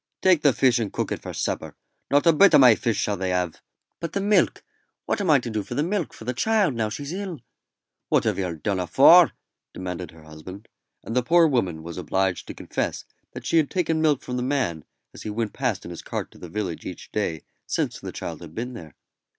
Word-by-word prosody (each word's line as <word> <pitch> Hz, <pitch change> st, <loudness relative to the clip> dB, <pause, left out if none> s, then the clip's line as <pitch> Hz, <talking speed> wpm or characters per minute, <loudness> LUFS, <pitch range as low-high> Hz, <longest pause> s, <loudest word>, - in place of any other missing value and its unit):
"Take 185 Hz, -4 st, +5 dB
the 145 Hz, -, +5 dB
fish 125 Hz, -1 st, +3 dB
and 110 Hz, -4 st, -2 dB
cook -, -, -3 dB
it -, -, -3 dB
for -, -, -6 dB
supper. -, -, -3 dB, 0.3 s
Not 145 Hz, +3 st, +3 dB
a 165 Hz, -, +6 dB
bit 195 Hz, +6 st, +6 dB
o' -, -, +9 dB
my 130 Hz, -4 st, +8 dB
fish 110 Hz, -1 st, -1 dB
shall 105 Hz, -1 st, 0 dB
they 95 Hz, 0 st, -2 dB
have." 90 Hz, -2 st, -1 dB, 0.4 s
"But 170 Hz, -2 st, -5 dB
the 200 Hz, -, 0 dB
milk. 205 Hz, +1 st, +2 dB, 0.4 s
What 210 Hz, -, -1 dB
am 190 Hz, -, -1 dB
I 150 Hz, -, +7 dB
to 120 Hz, -2 st, -4 dB
do 110 Hz, -1 st, -1 dB
for 100 Hz, -, -7 dB
the 145 Hz, -, +1 dB
milk 180 Hz, -1 st, -1 dB
for -, -, -12 dB
the 125 Hz, -, -1 dB
child 210 Hz, -, +2 dB
now 110 Hz, -2 st, -1 dB
she's 140 Hz, +8 st, -6 dB
ill?" 190 Hz, -5 st, -5 dB, 0.7 s
"What -, -, +3 dB
have -, -, 0 dB
yer 90 Hz, -3 st, -2 dB
done 95 Hz, +4 st, -2 dB
afore?" 90 Hz, -2 st, +7 dB, 0.4 s
demanded 90 Hz, -2 st, -5 dB
her 80 Hz, -1 st, -16 dB
husband; 80 Hz, +7 st, -11 dB, 0.3 s
and 115 Hz, -, -5 dB
the 125 Hz, -, +4 dB
poor 170 Hz, +6 st, +5 dB
woman 95 Hz, -, 0 dB
was 85 Hz, +2 st, -7 dB
obliged 90 Hz, +2 st, -1 dB
to -, -, -7 dB
confess -, -, -3 dB, 0.3 s
that -, -, -8 dB
she 165 Hz, -, +2 dB
had 155 Hz, -3 st, +3 dB
taken 165 Hz, -3 st, 0 dB
milk 150 Hz, -4 st, +2 dB
from 125 Hz, -, -4 dB
the -, -, -1 dB
man 125 Hz, -, -1 dB, 0.3 s
as -, -, -11 dB
he -, -, -5 dB
went 110 Hz, 0 st, -2 dB
past 125 Hz, -7 st, -2 dB
in -, -, -7 dB
his 85 Hz, -, -7 dB
cart -, -, -5 dB
to -, -, -17 dB
the 90 Hz, -, -9 dB
village 90 Hz, -2 st, -4 dB
each 90 Hz, -, -8 dB
day 85 Hz, -7 st, -2 dB, 0.2 s
since -, -, -1 dB
the -, -, -7 dB
child 80 Hz, -2 st, -6 dB
had 80 Hz, -2 st, -11 dB
been 125 Hz, +2 st, -4 dB
there. 80 Hz, -, -10 dB
115 Hz, 235 wpm, -24 LUFS, 90-150 Hz, 0.7 s, o